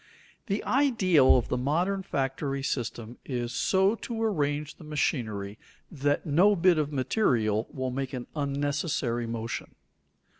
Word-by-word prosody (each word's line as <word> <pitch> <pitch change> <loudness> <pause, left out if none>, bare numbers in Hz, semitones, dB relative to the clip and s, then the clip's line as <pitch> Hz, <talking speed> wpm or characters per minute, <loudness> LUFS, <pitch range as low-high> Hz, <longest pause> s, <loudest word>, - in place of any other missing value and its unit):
The 200 0 -1
ideal 195 - +4
of 120 - -2
the 125 - 0
modern 175 +9 0
factory 135 -4 -2
system 120 -3 -4
is 120 -2 -3
so 190 +2 +3
to 230 0 -4
arrange 150 -8 -1
the - - -13
machinery 110 -9 -2 0.3
that 145 0 0
no 180 +7 +4
bit 175 -2 +4
of 150 -1 -1
material 120 - +1
will 130 -1 -3
make 135 +1 -3
an 125 -2 -4
unnecessary 140 -4 -1
motion. 115 0 -5
140 Hz, 135 wpm, -28 LUFS, 125-175 Hz, 0.3 s, ideal